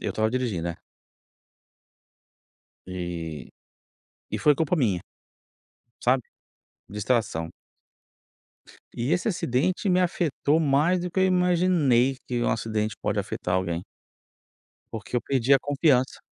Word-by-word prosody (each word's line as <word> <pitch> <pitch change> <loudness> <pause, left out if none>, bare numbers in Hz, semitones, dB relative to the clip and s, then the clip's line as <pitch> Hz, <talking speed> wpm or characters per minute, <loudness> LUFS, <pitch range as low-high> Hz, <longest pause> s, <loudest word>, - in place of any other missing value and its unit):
Eu - - -2
estava 110 0 0
dirigindo. 115 -10 -1
É. 85 - -6 2.1
E 85 -4 -5 0.8
e - - -2
foi 150 - +4
culpa 160 +4 0
minha 105 - +1 1.0
sabe, 125 0 +3 0.7
distração. 105 -6 -1 1.5
E 120 +6 -1
esse 180 +5 +1
acidente 175 - 0
me 180 0 +3
afetou 165 -4 +1
mais 155 +4 +2
do 180 0 -4
que 190 - 0
eu 190 - +5
imaginei 175 -8 +3
que 120 -1 -1
um - - +1
acidente 110 -1 -1
pode - - -1
afetar 90 - -2
alguém. 85 -2 -1 1.1
Porque 110 +2 -4
eu - - +2
perdi 135 0 +1
a 135 - +7
confiança. 140 -2 +1
130 Hz, 115 wpm, -26 LUFS, 105-165 Hz, 2.1 s, a